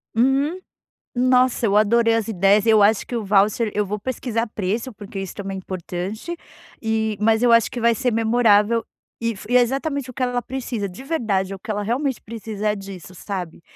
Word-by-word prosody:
Uhum. 275 +9 +2 0.6
Nossa, 250 -1 +3
eu 200 -2 +2
adorei 230 +2 +4
as 225 -1 0
ideias. 200 0 +3
Eu 220 -2 +5
acho 210 0 +3
que 245 - -5
o 225 -3 -2
voucher 210 +2 +2
eu 210 0 0
vou 210 +2 -4
pesquisar 235 -1 -2
preço, 220 +4 -3
porque 200 -1 -8
isso 195 -2 -5
também 195 -1 -5
é - - -4
importante, 190 - -5 0.5
e 220 -2 -1
mas 220 +1 +3
eu 245 -1 +4
acho 230 -1 +5
que 240 - -4
vai 235 0 +4
ser 250 -1 0
memorável 225 -1 +3 0.4
e 230 0 0
f 210 - -11
e 250 - +6
é - - +6
exatamente 275 +2 -1
o - - -8
que 255 - -2
ela 245 0 0
precisa, 245 -5 -4
de 185 +8 -10
verdade, 215 - -1
é 195 - -4
o - - -12
que 215 - -13
ela 205 -1 -1
realmente 260 +3 -1
precisa, 215 -1 -4
é 210 - 0
disso, 195 -2 -9
sabe? 180 -3 -6
220 Hz, 210 wpm, -22 LUFS, 200-245 Hz, 0.6 s, e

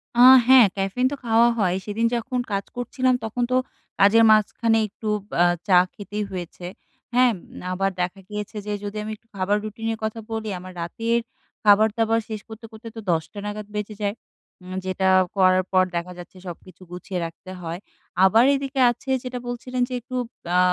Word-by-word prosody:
আ - - 0 0.3
হ্যাঁ 260 -2 +8
ক্যাফেইন 195 +6 0
তো - - -2
খাওয়া 230 +1 +5
হয়। 185 -3 +2
সেদিন 215 +2 -1
যখন 250 +2 -2
কাজ 200 0 -1
করছিলাম 255 +1 0
তখন 230 +3 -2
তো - - +3 0.4
কাজের 215 +3 +6
মাঝখানে 225 +1 +3
একটু 215 +2 -9 0.3
আ - - +7 0.2
চা 185 -3 +6 0.2
খেতেই 205 +1 -5
হয়েছে, 175 -1 -7 0.5
হ্যাঁ? 250 0 +5
এম 180 - -11
আবার 195 +1 0
দেখা 180 +2 -3
গিয়েছে 210 +1 -6
যে 210 - -2
যদি 205 +1 -5
আমি 215 - -5
একটু 225 - -30
খাবার 195 +2 +1
রুটিনের 225 +1 -4
কথা 220 +1 -3
বলি। 220 -1 -3
আমার 185 +1 -10
রাতের 230 +7 -1 0.4
খাবার-দাবার 220 +2 +4
শেষ 215 -2 -5
করতে, 220 +1 -10
করতে 220 +1 -11
তো - - -6
১০ 160 -1 +1
টা 205 - -7
নাগাদ 210 0 -5
বেজে 210 0 -4
যায়। 205 0 -1 0.5
উম 185 +1 -7
যেটা 190 0 0 0.3
করার 185 -1 +4
পর 185 -1 +5
দেখা 170 +1 -3
যাচ্ছে 175 +1 -12
সবকিছু 180 +2 -10
গুছিয়ে 180 +1 -5
রাখতে 165 +3 -10
হয়। 170 0 -5 0.5
আবার 220 +5 +5
এদিকে 275 0 -3
আছে 240 +3 -10
যেটা 250 -1 -5
বলছিলেন 250 +1 -4
যে - - -5
একটু 255 +2 -8 0.4
আ - - +5
210 Hz, 180 wpm, -23 LUFS, 190-230 Hz, 0.5 s, হ্যাঁ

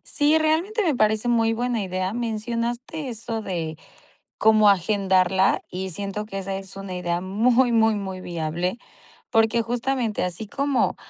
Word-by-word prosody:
Sí, 295 +1 +4
realmente 330 +8 +1
me 320 -8 +1
parece 215 +1 +2
muy 225 -1 +3
buena 240 0 -1
idea. 185 0 -2
Mencionaste 235 +5 -3
eso 225 -1 -4
de 165 -5 -4 0.6
cómo 215 -1 +5
agendarla 190 -1 +2
y 190 +1 -4
siento 200 +3 -4
que 195 - -6
esa 195 0 -3
es 195 0 -8
una 195 -2 -6
idea 175 -1 -1
muy, 235 +7 +2
muy, 225 -1 +4
muy 190 -2 -5
viable. 175 +3 -3 0.5
Porque 225 0 +3
justamente 240 -1 -1
así 180 +4 -3
como 280 +4 0
215 Hz, 145 wpm, -24 LUFS, 190-240 Hz, 0.6 s, cómo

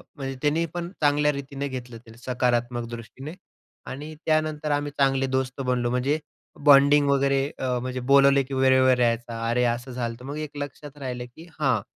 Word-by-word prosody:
म्हणजे 135 -2 -5
त्याने 155 +3 +1
पण 175 0 -4
चांगल्या 150 0 +3
रीतीने 140 0 -5
घेतलं, 125 -3 -7 0.2
सकारात्मक 120 -1 -1
दृष्टीने. 120 +6 -8 0.5
आणि 150 +4 -7
त्यानंतर 155 -1 0
आम्ही 145 0 -1
चांगले 135 -1 +2
दोस्त 130 0 -2
बनलो 125 -2 0
म्हणजे 130 +5 0 0.5
बॉन्डिंग 145 +1 +6
वगैरे. 140 0 +2 0.2
अ, 125 -1 0
म्हणजे 130 0 -4
बोलवले 140 0 +6
की 135 - -9
वेळेवर 130 -1 +4
यायचा. 115 -1 0
अरे 125 +1 +2
असं 120 +2 -2
झालंत. 120 0 -4
मग 140 +3 -6
एक 150 -1 -6
लक्षात 145 0 -7
राहिलं 125 -3 -5
की 165 +2 -12
हां, 130 -8 +2
135 Hz, 160 wpm, -25 LUFS, 125-145 Hz, 0.5 s, बॉन्डिंग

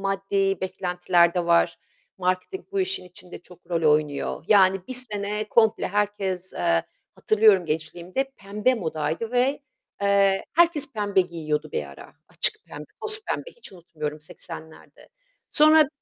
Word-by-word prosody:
maddi 195 -1 0
beklentiler 180 -2 +1
de 175 -1 0
var. 170 0 +3 0.4
Marketing 185 - -2
bu 395 - 0
işin 375 - -2
içinde 180 0 -11
çok 180 +1 -18
rol 165 -1 0
oynuyor. 150 0 -1
Yani, 190 -2 +4
bir 255 - -5
sene 210 -4 0
komple 220 -1 +3
herkes, 195 -2 -2
eee, 85 0 +1 0.3
hatırlıyorum 210 -5 +4
gençliğimde 175 - -3
pembe 210 +5 0
modaydı 160 +1 -3
ve, 260 +4 +1 0.4
eee, 200 -1 +3
herkes 315 -5 +3
pembe 205 -3 +1
giyiyordu 155 -4 -3
bir 75 - -2
ara. 70 0 -13
Açık - - +2
pembe, 150 +1 -9 0.2
toz 430 0 +3
pembe. - - -4
Hiç 480 - -6
unutmuyorum 155 -4 -7
80'lerde. 160 0 -10 0.4
Sonra 310 0 +6
190 Hz, 135 wpm, -24 LUFS, 170-215 Hz, 0.4 s, Sonra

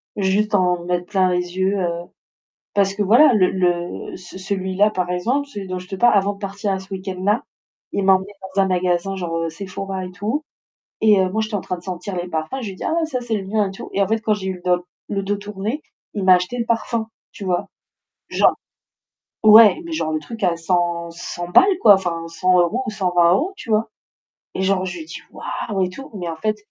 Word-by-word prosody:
juste 205 +2 +1
en 180 -2 +1
mettre 180 0 -1
plein 190 -3 +2
les 180 0 -2
yeux, 190 +2 +2
heu 170 -1 -2 0.7
parce 195 -1 +2
que 210 - 0
voilà 245 +8 +6
le 185 -4 +4
le 175 -2 -1
ce 185 0 -11
celui-là 190 +1 +1
par 180 -3 -2
exemple, 250 +11 0
celui 200 -7 -7
dont 185 0 -3
je 180 - -12
te 195 - -4
parle, 240 0 +5
avant 200 +1 +2
de 200 - -15
partir 200 0 -3
à 190 - -1
ce 190 +1 -10
week-end-là, 190 +3 -1 0.5
il 200 - -1
m'a 190 - +7
emmené 190 +2 -3 0.2
dans 195 - +4
un 195 - +2
magasin 180 +1 0
genre, 170 -2 -3
heu, 165 - -1
Sephora 190 +2 -5
et 180 - -8
tout. 215 +12 -3 0.6
Et, 210 -3 +5
heu, 185 - +1
moi 220 +3 -1
j'étais 215 0 -4
en 200 - 0
train 180 -1 -4
de - - -14
sentir 185 +1 -5
les 175 0 -3
parfums, 160 +8 -3
je 220 - -4
lui - - -8
dis: - - -8
«Ah - - 0
ouais! 330 -1 +1
Ca 255 -5 -3
c'est 235 -2 -3
le 195 -2 -5
mien» 210 -1 +1
et - - -6
tout. 195 - -9
Et 200 - +1
en 195 - +1
fait, 225 +1 +1
quand 215 -1 +1
j'ai 190 -2 -5
eu 190 - -2
le 175 - -16
doc 180 -1 +2 0.3
le 200 -1 -1
dos 205 +1 -1
tourné, 205 +6 -4 0.3
il 200 -2 -2
m'a 185 -1 +8
acheté 180 +7 -1
le 230 - -1
parfum, 230 -1 -1 0.2
tu 205 - -8
vois? 180 -2 -1 0.6
Genre - - +4 0.9
ouais, 215 +6 +8
mais 335 - -7
genre 155 - -1
le 155 - 0
truc 220 +7 -8
à 170 -2 +2
cent 170 0 0
cent 175 +1 -6
balles, 380 - +5
quoi! 210 -3 +9
Enfin, 170 -3 -1
100€ 180 +7 +2
ou - - -2
120€, 185 - +2
tu 255 - -11
vois? 220 +1 +2 0.7
Et 190 - -2
genre 190 -1 +1
je 185 - -5
lui 320 - -7
dis: - - -8
«Waouh!» 200 -3 -4
et - - -2
tout, 270 +9 -10
mais 175 -3 -4
en 165 - -3
fait 215 +6 -1
190 Hz, 235 wpm, -21 LUFS, 180-210 Hz, 0.9 s, quoi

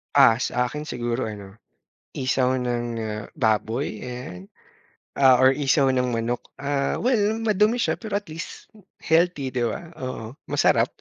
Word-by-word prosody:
Ah, 115 0 +7
sa 125 -1 0
akin 150 +1 -6
siguro 120 -2 -2
ano, 100 -1 -8 0.6
isaw 130 0 +1
ng, 120 -1 -1 0.2
ah, 105 -1 -4
baboy 110 -1 0
ayan, 125 -7 -7 0.7
ah, 130 -2 +7
or 130 - +7
isaw 135 0 +2
ng 125 -2 0
manok. 115 +1 -1 0.2
Ah, 140 0 -1
well 220 -4 +2
madumi 215 +2 +2
siya - - 0
pero 220 -3 -6
at 205 -4 -2
least 165 +2 -8 0.3
healthy, 160 -5 +2
di 120 -2 0
ba? 165 +9 -5
Oo, 130 -1 -6
masarap. - - +3
130 Hz, 145 wpm, -24 LUFS, 120-150 Hz, 0.7 s, Ah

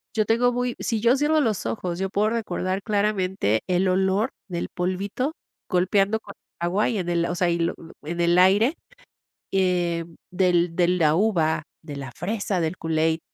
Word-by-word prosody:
yo 215 -1 +2
tengo 235 +3 +3
muy, 245 0 -1
si 225 -2 -1
yo 240 +3 +4
cierro 300 +2 +2
los 215 -6 -1
ojos, 180 -4 -3
yo 195 - -1
puedo 205 +2 +1
recordar 195 -4 -2
claramente 195 - 0
el 185 +1 +2
olor 190 +6 +1 0.2
del 170 -1 -3
polvito 195 - -2 0.4
golpeando 195 +3 +2
con 200 - -11 0.3
el - - +1
agua 190 +5 +1
y 230 - -1
en 180 -3 -2
el, 170 -1 +1
o 175 - -2
sea, 175 0 +1
y 170 - 0
lo 170 - 0 0.3
en 170 +3 -3
el 170 +1 +3
aire, 205 - +4 0.8
eh, 175 -3 +1
mm, 165 -1 -17 0.2
del 175 -2 +2
de 175 -1 +3
la 165 -4 +3
uva, 165 -6 +1 0.2
de 150 -3 -8
la 135 -3 -7
fresa, 195 - -2
del 165 +2 -2
Kool-Aid. 160 0 0
185 Hz, 185 wpm, -24 LUFS, 170-210 Hz, 0.8 s, yo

